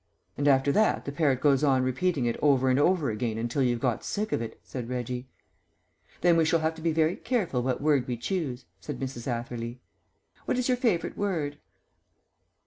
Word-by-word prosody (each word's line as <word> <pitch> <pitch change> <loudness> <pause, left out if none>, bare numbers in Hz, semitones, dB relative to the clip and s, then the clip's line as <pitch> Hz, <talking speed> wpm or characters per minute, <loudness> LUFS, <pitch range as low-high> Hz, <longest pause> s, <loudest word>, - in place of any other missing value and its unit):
"And 145 - 0
after 135 0 +4
that 215 +7 +2
the 140 - -3
parrot 140 -3 +1
goes 140 -1 +3
on 135 -3 +3
repeating 130 +2 0
it 115 - 0
over 130 -3 +4
and 130 - +3
over 155 -4 +2
again 110 +1 -2
until 120 +4 -1
you've 120 -2 +1
got 125 -2 -1
sick 210 +1 -2
of - - 0
it," 115 -1 -6
said 125 -2 -6
Reggie. 125 0 -4 0.9
"Then 175 -1 +5
we 165 - +4
shall 165 +1 +2
have 160 +1 +1
to 160 - -11
be 165 0 +1
very 160 +2 +2
careful 205 - -1
what 130 +1 -1
word 145 -4 +2
we 125 -1 -2
choose," 135 - -3
said - - -6
Mrs. 130 -2 -5
Atherley. 120 0 -4 0.7
"What - - 0
is 250 - 0
your 250 -1 +2
favourite 225 -9 0
word?" 160 -8 -2
140 Hz, 195 wpm, -28 LUFS, 125-165 Hz, 0.9 s, Then